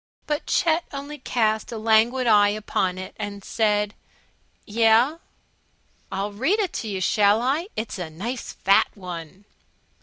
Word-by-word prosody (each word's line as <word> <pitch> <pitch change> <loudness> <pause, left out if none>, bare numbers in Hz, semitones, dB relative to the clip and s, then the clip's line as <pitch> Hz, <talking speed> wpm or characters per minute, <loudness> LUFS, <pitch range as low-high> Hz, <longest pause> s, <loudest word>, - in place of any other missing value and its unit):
But 295 -1 -2
Chet 335 0 +2
only 285 +1 -7
cast 220 -4 0
a 230 - -4
languid 225 +4 +3
eye 205 -3 +5
upon 200 -3 -1
it 185 0 -8
and 200 -1 -5
said, 210 -1 0 0.7
"Yeh?" 230 +7 +3 0.9
"I'll 200 +2 -2
read 270 - +1
it 390 -5 -1
to 225 - -6
you, 195 -3 -3
shall 205 +3 +3
I? 280 +9 0
It's 220 -2 -4
a 175 -3 -4
nice 230 +10 -5
fat 195 +1 +3
One." 180 0 -8
220 Hz, 145 wpm, -24 LUFS, 200-255 Hz, 0.9 s, eye